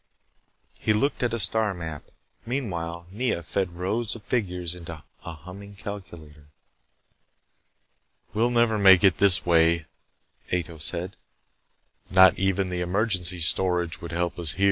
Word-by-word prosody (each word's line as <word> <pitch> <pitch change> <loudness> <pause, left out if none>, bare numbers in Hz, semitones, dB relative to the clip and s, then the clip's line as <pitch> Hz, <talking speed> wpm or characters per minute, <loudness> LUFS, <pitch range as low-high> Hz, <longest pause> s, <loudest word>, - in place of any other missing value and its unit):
He 110 - +1
looked 140 +7 0
at 125 - 0
a 115 - -2
star 105 +1 +1
map. 80 -4 -7 0.4
Meanwhile, 85 -10 -4
Nea 110 -4 -2
fed 90 +1 -3
rows 105 +6 -2
of 110 - -12
figures 90 -7 -2
into 85 -3 -10 0.2
a 85 - -7
humming 100 +5 -12
calculator. 85 -8 -10 1.9
"We'll 115 +3 +1
never 115 -3 +2
make 95 -2 +6
it 95 -3 +4
this 100 -3 +5
way," 85 -1 +3 0.7
Ato 85 -2 -3
said. 90 +4 0 0.9
"Not 95 -1 +5
even 95 0 0
the 90 0 -3
emergency 90 -1 +2
storage 90 0 +1
would 85 - -7
help 85 +1 -2
us. 80 -4 -2
90 Hz, 130 wpm, -25 LUFS, 85-105 Hz, 1.9 s, make